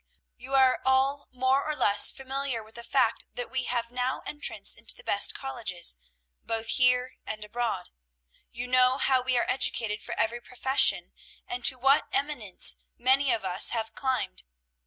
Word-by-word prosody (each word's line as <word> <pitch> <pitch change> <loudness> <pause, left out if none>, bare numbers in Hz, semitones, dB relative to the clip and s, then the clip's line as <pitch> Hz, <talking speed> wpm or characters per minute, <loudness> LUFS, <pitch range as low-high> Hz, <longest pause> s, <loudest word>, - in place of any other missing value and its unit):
You 265 +3 -5
are 260 -1 +4
all 265 +2 +1
more 260 +2 +1
or 305 0 -3
less 205 -6 +4
familiar 270 -3 -4
with 220 +1 -17
the 235 - -7
fact - - 0
that 245 - -6
we 260 -1 -2
have 235 -1 -3
now 250 +1 -3
entrance 300 +2 -2
into - - -4
the - - -16
best - - +3
colleges, 230 - -2 0.5
both 225 0 -3
here 250 0 +2
and 215 -1 -4
abroad. 235 - -4 0.6
You 240 +1 -6
know 255 +1 +3
how 265 -2 +2
we 255 0 0
are 240 - +1
educated 225 -4 0
for - - -6
every 240 +2 -1
profession, 265 +3 +2 0.3
and 365 -1 -6
to 260 - +6
what 270 +3 +3
eminence 275 -10 0 0.2
many 260 +2 +3
of 220 -4 -2
us 185 +2 +4
have 225 0 -4
climbed. 255 - -2
250 Hz, 165 wpm, -27 LUFS, 230-265 Hz, 0.6 s, to